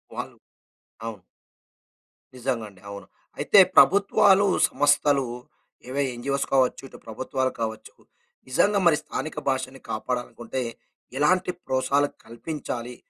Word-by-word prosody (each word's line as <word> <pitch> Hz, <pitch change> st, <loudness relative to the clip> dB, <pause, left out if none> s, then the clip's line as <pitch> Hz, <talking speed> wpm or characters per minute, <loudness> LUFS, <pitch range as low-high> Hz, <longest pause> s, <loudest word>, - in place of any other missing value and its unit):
వాళ్ళు -, -, -6 dB, 0.7 s
అవును. 110 Hz, -3 st, -6 dB, 1.2 s
నిజంగా 125 Hz, -3 st, -2 dB
అండి. 95 Hz, -2 st, -20 dB
అవును. 100 Hz, -2 st, -9 dB, 0.3 s
అయితే -, -, +5 dB, 0.2 s
ప్రభుత్వాలు, 200 Hz, 0 st, +5 dB, 0.2 s
సంస్థలు 145 Hz, -1 st, +2 dB, 0.6 s
ఏవో 140 Hz, +2 st, -1 dB
ఎన్‌జీ‌ఓస్‌ 140 Hz, +3 st, -2 dB
కావచ్చు 130 Hz, 0 st, +2 dB
ఇటు -, -, -13 dB
ప్రభుత్వాలు 130 Hz, +3 st, -2 dB
కావచ్చు. 110 Hz, -1 st, -5 dB, 0.5 s
నిజంగా 200 Hz, +10 st, +2 dB
మరి 155 Hz, -3 st, +5 dB
స్థానిక 155 Hz, -, -5 dB
భాషని 130 Hz, 0 st, -3 dB
కాపాడాలనుకుంటే 120 Hz, +2 st, -4 dB, 0.6 s
ఎలాంటి 180 Hz, +5 st, +2 dB
ప్రోత్సహాలు 135 Hz, +2 st, +1 dB, 0.2 s
కల్పించాలి? 120 Hz, 0 st, -6 dB
130 Hz, 100 wpm, -25 LUFS, 120-145 Hz, 1.2 s, అయితే